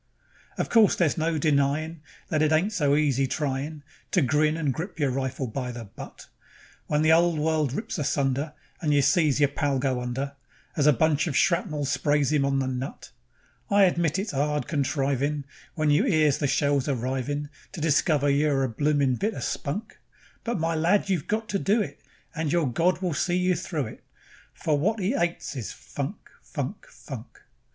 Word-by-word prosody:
Of - - -1
course 225 -3 +5
there's 170 -5 +2
no 160 0 0
denyin' 150 +2 +1 0.3
That 155 -2 +1
it 155 0 +3
ain't 170 +7 +2
so 145 -7 +2
easy 140 -3 +2
tryin' 145 +2 -3 0.3
To 180 - +2
grin 150 +4 +2
and 150 -5 0
grip 170 +2 -6
your 140 -3 +2
rifle 130 0 -2
by 125 +1 -4
the 120 -1 -7
butt, 100 - -11 0.6
When 150 +1 +1
the 155 - +5
'ole 170 0 +4
world 155 -2 +1
rips 185 +1 -4
asunder, 140 +1 0 0.3
And 150 -3 +2
you 140 - +4
sees 155 -3 +3
yer 145 - +5
pal 140 0 -1
go 130 -2 0
under, 135 +3 -3 0.4
As 145 -1 +2
a - - +8
bunch 150 +3 +2
of 145 - 0
shrapnel 165 -5 +1
sprays 145 +1 +1
'im 140 -2 +3
on 140 0 +1
the 135 - 0
nut; 130 +1 -5 0.6
I 200 -1 +5
admit 170 -3 +2
it's 195 -1 -3
'ard 150 +2 0
contrivin' 140 0 0 0.3
When 155 -3 +2
you 160 - +3
'ears 155 - +3
the 145 - +1
shells 140 -1 +1
arrivin', 135 +2 -2 0.2
To - - -6
discover 155 -1 +2
you're 140 -1 +2
a 130 - 0
bloomin' 140 +1 +1
bit 215 +1 -1
o' - - -5
spunk; 200 +10 -4 0.4
But, 235 0 -1
my 165 +1 0
lad, 175 +6 +2
you've 175 -7 -1
got 220 +1 -1
to 200 - 0
do 205 +5 +2
it, 175 -10 -4 0.3
And 155 -2 -2
your 170 -2 +2
God 175 +9 +1
will 180 -3 0
see 175 +4 0
you 180 0 +2
through 160 -4 -3
it, 110 - -10 0.5
For 155 - 0
wot 215 +8 +1
'E 195 +5 0
'ates 170 - -1
is 120 -6 -4
funk, 145 +8 -5 0.3
funk, - - -5
funk. - - -10
150 Hz, 185 wpm, -26 LUFS, 140-165 Hz, 0.6 s, a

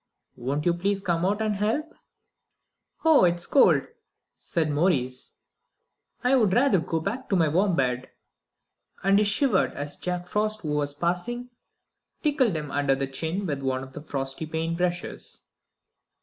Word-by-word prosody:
Won't 140 +5 -3
you 175 - +4
please 195 +3 0
come 175 -4 -1
out 205 +2 0
and 210 -2 0
help?" 225 +10 -1 1.1
"Oh, 320 -8 +6
it's 175 -1 +2
so - - -16
cold!" 275 - +6 0.5
said 160 -3 -1
Maurice; 140 -5 0 0.9
"I'd 250 -5 +4
rather 245 -6 +4
go 165 0 -2
back 230 +11 -4
to 200 - +2
my 165 -3 +3
warm 180 +4 +2
bed;" 125 -2 -1 0.9
"and 195 +1 +4
he - - +4
shivered 210 +1 +2
as 145 +1 -5
Jack 180 -1 -3
Frost, 215 +3 0
who 155 - -3
was 145 -1 -1
passing, 205 +10 -2 0.7
tickled 275 - +2
him 150 -2 -5
under 140 -1 +2
the 135 0 -1
chin 160 +8 -3
with 145 -5 -3
one 130 -1 -1
of 135 0 -11
the 150 - -7
frosty 135 0 -4
paint 160 +1 -2
brushes. 175 0 -4
175 Hz, 155 wpm, -26 LUFS, 145-210 Hz, 1.1 s, Oh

